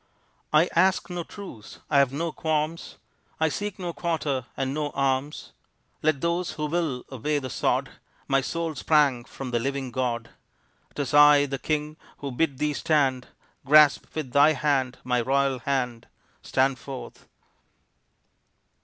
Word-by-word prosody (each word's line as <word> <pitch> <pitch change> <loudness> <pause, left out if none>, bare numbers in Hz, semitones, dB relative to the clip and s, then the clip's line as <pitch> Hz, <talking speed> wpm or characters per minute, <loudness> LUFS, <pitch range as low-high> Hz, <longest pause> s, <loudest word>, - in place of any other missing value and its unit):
I 155 +3 +5
ask 185 +1 +2
no 175 -1 -3
truce, 175 - -11
I 145 - +3
have 135 -2 +3
no 165 +4 -2
qualms, 155 +1 -2 0.4
I 160 0 +3
seek 205 +5 -4
no 175 -2 -4
quarter 150 -8 -2
and 135 0 -1
no 150 0 -2
alms. 135 +1 -1 0.5
Let 150 -3 +1
those 170 +1 -1
who 155 -1 -3
will 150 -5 -2
obey 140 +4 -1
the 130 -3 -4
sod, - - 0 0.4
My 135 0 +3
soul 165 +4 -3
sprang 140 -4 +2
from 130 -1 -7
the 120 - +1
living 135 +1 -3
God. 120 -2 -2 0.6
'Tis 145 -1 -3
I, 145 -1 +7
the 135 -1 -4
king, 150 +4 -2 0.2
who 140 -1 -5
bid 135 +1 0
thee 150 +1 0
stand; 140 -6 +1 0.4
Grasp 150 +1 +5
with 150 -5 -4
thy 145 +4 +5
hand 135 -3 0
my 125 -1 +1
royal 135 +1 +1
hand 125 -2 -2 0.3
Stand 130 -1 +1
forth! 135 -2 -9
140 Hz, 145 wpm, -26 LUFS, 130-155 Hz, 0.6 s, I